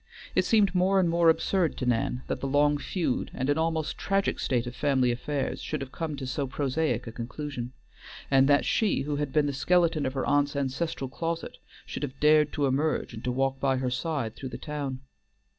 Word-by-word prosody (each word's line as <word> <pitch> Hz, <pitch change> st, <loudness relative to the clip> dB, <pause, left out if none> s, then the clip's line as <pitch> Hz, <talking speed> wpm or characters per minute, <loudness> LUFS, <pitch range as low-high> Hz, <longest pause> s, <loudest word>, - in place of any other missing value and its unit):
It -, -, +2 dB
seemed 205 Hz, -5 st, +4 dB
more 190 Hz, +1 st, +3 dB
and 180 Hz, -, +3 dB
more 170 Hz, 0 st, +4 dB
absurd 165 Hz, +1 st, +1 dB
to 130 Hz, -, -2 dB
Nan 125 Hz, +1 st, 0 dB
that -, -, -3 dB
the 135 Hz, -, -3 dB
long 145 Hz, +1 st, +3 dB
feud 170 Hz, -7 st, -1 dB
and 130 Hz, -, -2 dB
almost 160 Hz, -1 st, -1 dB
tragic 195 Hz, 0 st, 0 dB
state 125 Hz, -2 st, 0 dB
of 125 Hz, 0 st, -6 dB
family 130 Hz, -4 st, +2 dB
affairs 135 Hz, +3 st, -2 dB
should 155 Hz, -, -3 dB
have 135 Hz, -1 st, -6 dB
come 160 Hz, -3 st, -4 dB
to 135 Hz, -1 st, -6 dB
so 135 Hz, +2 st, -2 dB
prosaic 140 Hz, -2 st, -1 dB
a 115 Hz, -, -6 dB
conclusion, 125 Hz, +1 st, -5 dB, 0.6 s
and 135 Hz, 0 st, +5 dB
that 145 Hz, 0 st, +4 dB
she 215 Hz, -10 st, +2 dB
who 145 Hz, +1 st, -2 dB
had 145 Hz, -2 st, -2 dB
been 150 Hz, 0 st, +3 dB
the 145 Hz, -, -1 dB
skeleton 165 Hz, 0 st, +2 dB
of 130 Hz, -, -3 dB
her 135 Hz, -, -1 dB
aunt's 145 Hz, 0 st, +2 dB
ancestral 140 Hz, +1 st, -2 dB
closet 165 Hz, +5 st, -4 dB, 0.3 s
should -, -, -6 dB
have 135 Hz, -2 st, -5 dB
dared 150 Hz, 0 st, +5 dB
to 145 Hz, -, +1 dB
emerge 140 Hz, +4 st, 0 dB
and 110 Hz, -, -8 dB
to 125 Hz, -, +1 dB
walk 135 Hz, +1 st, 0 dB
by 135 Hz, -1 st, +1 dB
her 130 Hz, -1 st, -1 dB
side 125 Hz, -4 st, -2 dB
through 130 Hz, -, -6 dB
the -, -, -6 dB
town. 140 Hz, -4 st, -4 dB
145 Hz, 210 wpm, -28 LUFS, 130-160 Hz, 0.6 s, and